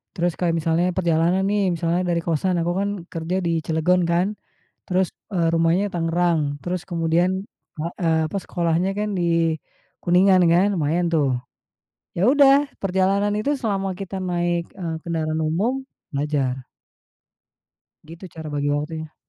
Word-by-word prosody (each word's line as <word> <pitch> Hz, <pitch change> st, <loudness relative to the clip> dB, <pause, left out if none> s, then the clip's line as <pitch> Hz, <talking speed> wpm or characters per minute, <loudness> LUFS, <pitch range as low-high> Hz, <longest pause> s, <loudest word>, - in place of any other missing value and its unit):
Terus 175 Hz, 0 st, +1 dB
kayak 170 Hz, -2 st, +1 dB
misalnya 165 Hz, +2 st, +1 dB
perjalanan 175 Hz, +1 st, +2 dB
nih, 205 Hz, 0 st, +1 dB
misalnya 170 Hz, +2 st, 0 dB
dari 170 Hz, -1 st, +1 dB
kosan 175 Hz, +3 st, 0 dB
aku 175 Hz, +1 st, 0 dB
kan 200 Hz, 0 st, 0 dB, 0.2 s
kerja 165 Hz, +1 st, -3 dB
di 170 Hz, -, +1 dB
Cilegon 165 Hz, +3 st, +2 dB
kan, 175 Hz, +3 st, +2 dB, 0.6 s
terus, 185 Hz, -1 st, +1 dB, 0.2 s
eee, 170 Hz, -2 st, +2 dB
rumahnya 165 Hz, +5 st, +2 dB
Tangerang 170 Hz, 0 st, +1 dB, 0.2 s
terus 180 Hz, -1 st, -3 dB
kemudian, 170 Hz, +1 st, +1 dB, 0.7 s
eee, 165 Hz, -3 st, +2 dB
apa, 200 Hz, -, -2 dB
sekolahnya 175 Hz, +1 st, 0 dB
kan 210 Hz, 0 st, -1 dB
di 165 Hz, -2 st, +1 dB, 0.5 s
Kuningan, 185 Hz, +2 st, +5 dB
kan 190 Hz, +4 st, +4 dB
lumayan 170 Hz, +2 st, +1 dB
tuh. 140 Hz, -5 st, +2 dB, 0.8 s
Ya 190 Hz, +7 st, +3 dB
udah, 280 Hz, 0 st, +5 dB
perjalanan 195 Hz, +2 st, +1 dB
itu 285 Hz, +7 st, 0 dB
selama 195 Hz, -5 st, -1 dB
kita 195 Hz, 0 st, -5 dB
naik, 175 Hz, -1 st, -1 dB
eee, 170 Hz, -3 st, -3 dB
kendaraan 160 Hz, -2 st, -2 dB
umum, 205 Hz, +13 st, 0 dB, 0.3 s
belajar. 140 Hz, -3 st, -1 dB, 1.4 s
Gitu 165 Hz, +3 st, -11 dB
cara 160 Hz, -1 st, -7 dB
bagi 145 Hz, 0 st, -1 dB
waktunya. 155 Hz, +1 st, -4 dB
175 Hz, 135 wpm, -22 LUFS, 165-190 Hz, 1.4 s, Kuningan